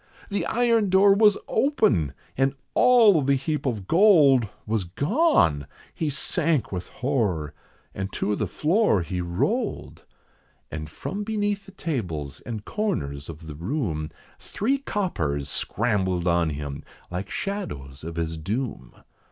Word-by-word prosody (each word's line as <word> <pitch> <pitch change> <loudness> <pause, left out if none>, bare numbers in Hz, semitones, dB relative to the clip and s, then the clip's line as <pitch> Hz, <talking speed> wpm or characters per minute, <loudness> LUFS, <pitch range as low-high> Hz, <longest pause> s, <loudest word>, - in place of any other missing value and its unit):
The 200 -1 -1
iron 230 -3 +2
door 195 +2 +6
was 210 0 +5
open, 215 - +2 0.2
and 135 +1 +1 0.2
all 230 -9 +6
the 140 0 +2
heap 145 +2 -2
of 105 -7 -3
gold 155 - +6 0.2
Was 110 -2 0
gone! 140 - +2 0.3
He 160 - -2
sank 150 - 0
with 90 -2 -4
horror, 105 - -1 0.4
and 95 0 -4
to 105 - 0
the 105 - -1
floor 155 - +2
he 90 +1 -3
rolled. 85 0 -2 0.7
And 75 -1 -5
from 200 - -5
beneath 205 -2 -1
the - - -11
tables 90 - -4
and 110 -3 -5
corners 70 - -2
of 80 0 -9
the 80 - -7
room, 85 - -2 0.3
Three 270 +7 -1
coppers 80 - -2
scrambled 95 - 0
on 85 -1 +2
him, 70 -1 -5 0.3
like 90 +2 -4
shadows 70 - -5
of 85 +1 -6
his 80 -1 -3
doom. 105 - -4
115 Hz, 135 wpm, -25 LUFS, -, 0.7 s, door